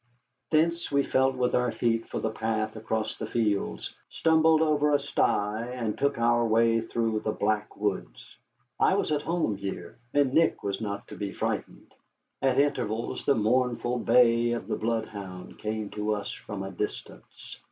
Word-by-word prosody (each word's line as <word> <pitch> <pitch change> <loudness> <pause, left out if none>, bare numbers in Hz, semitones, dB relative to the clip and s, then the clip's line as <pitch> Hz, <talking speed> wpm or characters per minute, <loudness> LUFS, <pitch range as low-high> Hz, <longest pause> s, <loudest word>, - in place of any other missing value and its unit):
Thence 170 +1 +1
we 140 0 +3
felt 130 0 +2
with 125 -1 0
our 125 -1 +2
feet 115 -1 0
for - - -4
the 110 - -1
path 110 0 -2
across 110 0 -3
the 110 - -3
fields, 105 -3 -1 0.2
stumbled 160 -1 +4
over 150 -1 +3
a - - +3
sty, 110 -5 0
and 115 -4 -2
took 140 0 0
our 120 0 +3
way 115 0 +3
through 115 -1 -1
the 110 - -2
black 105 0 -1
woods. 95 - -4 0.4
I - - +4
was - - 0
at 150 -1 +1
home 160 - -1
here, 95 -2 -6
and 140 -2 +2
Nick 165 +2 +3
was 100 +1 -2
not 100 -1 -4
to - - -8
be 100 -1 -4
frightened. - - -4 0.5
At 135 -1 +2
intervals 115 -6 -1
the 140 - +5
mournful 120 +2 +1
bay 120 0 +4
of 120 - -5
a - - +2
bloodhound 105 -5 -4
came 110 -1 -3
to 105 0 -1
us 100 -1 -5
from 100 -2 -6
a 95 - -5
distance. 100 +3 -7
115 Hz, 170 wpm, -28 LUFS, 105-130 Hz, 0.5 s, the